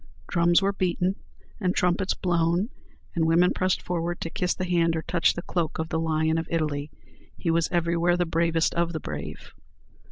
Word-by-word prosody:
Drums 175 +2 +3
were 200 +1 +2
beaten, 185 -1 0 0.5
and 185 -4 0
trumpets 180 +2 +1
blown, 175 +3 +1 0.4
and 165 -2 +1
women 170 +2 +4
pressed 185 0 0
forward 175 0 -2
to 165 - -4
kiss 180 0 0
the 185 - -3
hand 170 -2 +2
or 160 - -2
touch 170 -1 +2
the 175 - -5
cloak 170 -3 -2
of 160 0 -3
the 160 - -1
Lion 160 0 +1
of 165 - -4
Italy. 150 -3 -1 0.5
He 165 - 0
was 165 0 +1
everywhere 170 0 +2
the 175 - +1
bravest 165 0 +1
of 170 0 0
the 160 - -2
brave. 75 - -7
170 Hz, 185 wpm, -26 LUFS, 165-180 Hz, 0.5 s, women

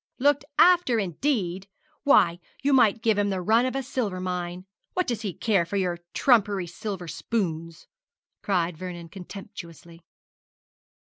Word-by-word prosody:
'Looked 285 +1 +2
after, 350 -9 +5
indeed! 195 - -1 0.3
Why, 175 -12 +4 0.2
you 280 0 +3
might 225 -4 +4
give 220 -3 +3
him 205 0 +1
the 190 -1 -1
run 225 +7 +3
of 255 - -3
a 270 - -1
silver 230 -7 -2
mine. 180 0 -4 0.3
What 365 0 0
does 235 -3 -2
he 205 -4 -2
care 195 0 +1
for 185 +4 -3
your 180 -3 -1 0.2
trumpery 205 -7 +3
silver 180 +1 -6
spoons?' 165 -2 -3 0.6
cried 175 -4 0
Vernon, 175 -2 -7
contemptuously. 170 -3 -10
195 Hz, 140 wpm, -26 LUFS, 175-235 Hz, 0.6 s, after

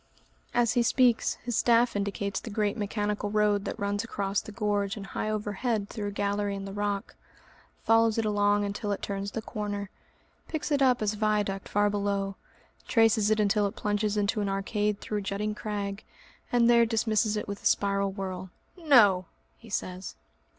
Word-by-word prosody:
As 235 -2 +2
he 240 - +3
speaks, 240 0 +3
his 240 -2 -2
staff 235 0 +3
indicates 200 0 -2
the - - -8
great 210 -1 0
mechanical 210 -1 -2
road 210 -1 +2
that - - -4
runs 205 0 -1
across 200 -3 -2
the - - -10
gorge 205 -1 -1
and 200 - -6
high 215 - -3
overhead 210 0 -2
through 210 -3 -4
a - - -3
gallery 205 0 -1
in 195 0 -5
the 195 - -7
rock, 205 -1 -2 0.7
follows 225 0 +4
it 225 - +1
along 205 0 +2
until 205 +1 -3
it - - -6
turns 200 0 -3
the 220 +2 -5
corner, 205 -2 -4 0.6
picks 315 -1 -4
it 285 -1 +2
up 250 -4 +4
as 210 0 +1
a - - -7
viaduct 205 -2 0
far 205 0 +2
below, 200 -1 -1 0.5
traces 225 -2 +4
it 215 0 +2
until 205 0 +3
it 200 - -7
plunges 210 0 -1
into 205 +1 +1
an 200 - -1
arcade 205 +1 -1
through 210 - -3
a - - -5
jutting 205 +2 -2
crag, 205 -1 -4 0.5
and 240 -1 +4
there 235 -1 +6
dismisses 220 -1 +1
it - - -4
with 200 0 -5
a - - +2
spiral 200 -1 +1
whirl. 190 -1 -5 0.3
"No!" 235 - +5 0.3
he 230 - -14
says. 185 -2 -4
205 Hz, 185 wpm, -28 LUFS, 200-220 Hz, 0.7 s, there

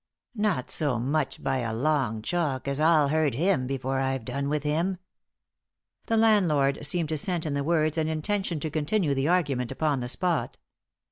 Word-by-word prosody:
"Not 205 - -1
so 145 -6 0
much 140 +5 -2
by 135 0 0
a 115 -2 -2
long 125 -5 0
chalk 150 -6 -1
as 140 +1 -1
I'll 155 -2 +4
hurt 155 -3 +1
him 165 -3 +1
before 135 0 -2
I've 135 -3 -1
done 140 +3 -2
with 150 -1 -1
him." 165 +5 0 1.1
The 225 - +1
landlord 170 -12 +3
seemed 160 +2 +1
to 155 -1 0
scent 175 0 0
in 150 - -2
the 140 0 -1
words 155 0 +1
an 155 - 0
intention 170 +2 -2
to 155 - -3
continue 155 +1 0
the 135 +1 0
argument 145 -9 +1
upon 145 0 0
the 125 0 -4
spot. 175 +4 -1
150 Hz, 180 wpm, -26 LUFS, 135-170 Hz, 1.1 s, I'll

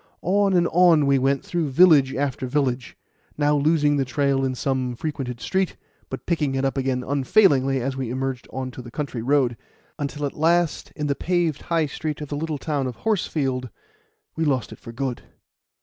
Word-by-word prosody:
On 195 +2 +2
and 175 -1 +3
on 170 -4 +5
we 140 -1 +3
went 135 +1 +1
through 170 -4 -1
village 140 -3 +5
after 135 -1 -2
village, 125 -3 -1 0.4
now 150 0 +2
losing 145 0 +3
the 135 - +2
trail 135 +1 0
in 130 -1 -1
some 130 -1 -1
frequented 130 -4 -4
street, 190 - -1 0.3
but - - -6
picking 150 -6 0
it 135 0 0
up 135 - 0
again 130 -2 -1
unfailingly 135 -1 +3
as 130 +2 -2
we 130 -3 -3
emerged 130 0 -3
on 130 0 -4
to 125 - -9
the 120 - -10
country 130 -2 -4
road, 130 -1 +2 0.4
until 145 0 -3
at 140 - -3
last, 170 +1 +1
in 150 - -3
the 145 - +1
paved 170 -1 0
High 165 -2 0
Street 150 +1 -4
of 150 -2 -7
the 145 - -3
little 155 0 -3
town 140 -1 -2
of 125 - -5
Horsefield, 135 - -1 0.7
we 160 - -1
lost 135 -7 0
it - - -10
for 115 - -10
good. 125 +1 -3
140 Hz, 190 wpm, -23 LUFS, 130-155 Hz, 0.7 s, on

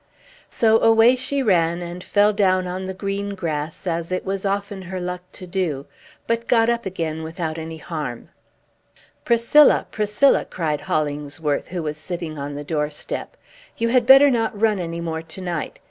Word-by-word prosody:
So 225 -1 +3
away 225 +2 +5
she 275 +2 0
ran, 175 -5 +2
and 175 +1 -7
fell 205 +1 +3
down 185 -3 +2
on 185 +1 -4
the 190 - -4
green 200 +1 -3
grass, 155 -2 -4
as 170 -1 -2
it 185 - -2
was 195 +1 -2
often 200 0 -3
her 185 0 -6
luck 180 0 -4
to 185 - -9
do, 175 -7 -2 0.4
but 230 0 -1
got 230 -1 +4
up 235 -3 -2
again, 160 -4 -3
without 160 0 -4
any 160 0 -6
harm. 150 -7 -6 1.0
"Priscilla, 235 +6 +5
Priscilla!" 210 +6 +3
cried 155 -4 -2
Hollingsworth, 150 -3 -2
who 175 -2 -4
was 150 -1 -4
sitting 160 -1 -6
on 140 +1 -5
the 145 - -5
doorstep; 150 -1 -4 0.4
"you 230 0 0
had 245 -1 +2
better 270 +1 +8
not 225 -4 -1
run 215 -2 +2
any 170 -1 -4
more 160 -1 -3
to 165 +3 -10
night. 175 -4 -4
185 Hz, 170 wpm, -22 LUFS, 160-210 Hz, 1.0 s, better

